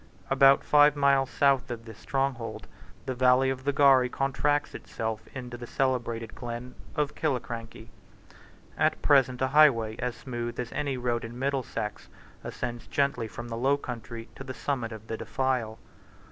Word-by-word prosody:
About 135 Hz, 0 st, +6 dB
five 150 Hz, 0 st, +5 dB
miles 140 Hz, -2 st, +3 dB
south 140 Hz, -3 st, +2 dB
of 115 Hz, -2 st, -6 dB
this 110 Hz, -2 st, -11 dB
stronghold, 135 Hz, -1 st, -2 dB, 0.4 s
the 130 Hz, -, -2 dB
valley 130 Hz, +1 st, +4 dB
of 130 Hz, 0 st, -6 dB
the 145 Hz, -, +3 dB
Garry 135 Hz, -3 st, +5 dB
contracts 140 Hz, +3 st, 0 dB
itself 110 Hz, -1 st, -4 dB
into 125 Hz, -2 st, -6 dB
the 120 Hz, 0 st, -8 dB
celebrated 120 Hz, -4 st, -1 dB
glen 120 Hz, +1 st, -6 dB, 0.2 s
of 150 Hz, -2 st, 0 dB
Killiecrankie. 115 Hz, -6 st, -4 dB, 0.9 s
At -, -, +2 dB
present 130 Hz, -2 st, +4 dB
a 130 Hz, -, +1 dB
highway 125 Hz, -7 st, +4 dB
as 125 Hz, -1 st, -2 dB
smooth 120 Hz, -2 st, -5 dB
as 120 Hz, -1 st, -4 dB
any 140 Hz, -2 st, -2 dB
road 120 Hz, -1 st, -1 dB
in 115 Hz, +1 st, -7 dB
Middlesex 130 Hz, -5 st, -3 dB, 0.4 s
ascends 120 Hz, -1 st, -5 dB
gently 140 Hz, -5 st, 0 dB
from 120 Hz, +2 st, -8 dB
the 115 Hz, -, -4 dB
low 135 Hz, +4 st, +2 dB
country 115 Hz, -3 st, -7 dB
to -, -, -9 dB
the 130 Hz, -, -7 dB
summit 125 Hz, -5 st, -2 dB
of 110 Hz, -1 st, -9 dB
the 115 Hz, -, -4 dB
defile. 115 Hz, -1 st, -1 dB
125 Hz, 160 wpm, -28 LUFS, 115-135 Hz, 0.9 s, About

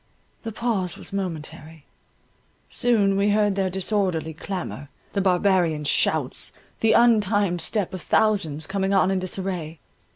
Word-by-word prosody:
The 225 Hz, -, -5 dB
pause 210 Hz, -6 st, -2 dB
was -, -, -9 dB
momentary. 160 Hz, -4 st, -6 dB, 0.9 s
Soon 210 Hz, -5 st, +2 dB
we 200 Hz, +1 st, +2 dB
heard 205 Hz, -1 st, +2 dB
their 190 Hz, -1 st, 0 dB
disorderly 185 Hz, -4 st, -1 dB
clamour, 170 Hz, -4 st, -6 dB, 0.2 s
the 200 Hz, -, 0 dB
barbarian 180 Hz, -4 st, +2 dB
shouts, 145 Hz, -, +1 dB, 0.3 s
the 225 Hz, -, +3 dB
untimed 205 Hz, -6 st, +3 dB
step 200 Hz, +2 st, 0 dB
of 185 Hz, -, -5 dB
thousands 160 Hz, -6 st, +1 dB
coming 195 Hz, +1 st, -1 dB
on 190 Hz, 0 st, +3 dB
in 190 Hz, -, +1 dB
disarray. 180 Hz, -4 st, -5 dB
190 Hz, 130 wpm, -24 LUFS, 170-205 Hz, 0.9 s, the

